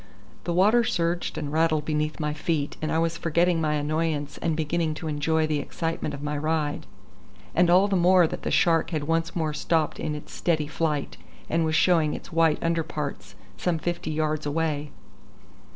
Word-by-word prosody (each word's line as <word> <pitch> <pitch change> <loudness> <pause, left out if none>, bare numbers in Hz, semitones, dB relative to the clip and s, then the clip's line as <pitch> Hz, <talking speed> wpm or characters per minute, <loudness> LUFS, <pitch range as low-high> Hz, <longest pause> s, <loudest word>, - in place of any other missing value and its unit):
The 175 - -1
water 215 +6 +5
surged 175 -7 -1
and 150 -2 -4
rattled 155 -2 +2
beneath 155 0 -1
my 150 -1 -1
feet, 150 -1 -2
and 155 - -1
I - - +1
was 165 0 0
forgetting 170 +1 +2
my 155 -1 +1
annoyance 150 0 -1
and 160 -2 -1
beginning 160 0 -1
to 160 - -6
enjoy 155 +1 +1
the 155 -1 0
excitement 165 0 -3
of 140 - -9
my 150 0 -2
ride; 155 -1 -1 0.7
and 175 +1 +4
all 185 +3 +5
the 200 - 0
more 180 0 +5
that - - -4
the - - -3
shark 165 -2 +3
had 155 -4 -2
once 165 +2 -1
more 160 -3 -1
stopped 155 +1 0
in 155 -1 -2
its 150 - -9
steady 160 -3 0
flight, 150 -1 -2 0.3
and 165 0 +2
was 160 0 0
showing 165 -3 +3
its - - -10
white 165 -2 +3
under 165 0 +1
parts 140 - -5 0.2
some 170 - 0
fifty 175 0 -3
yards 155 -1 -1
away. 150 -1 -1
160 Hz, 185 wpm, -26 LUFS, 150-165 Hz, 0.7 s, water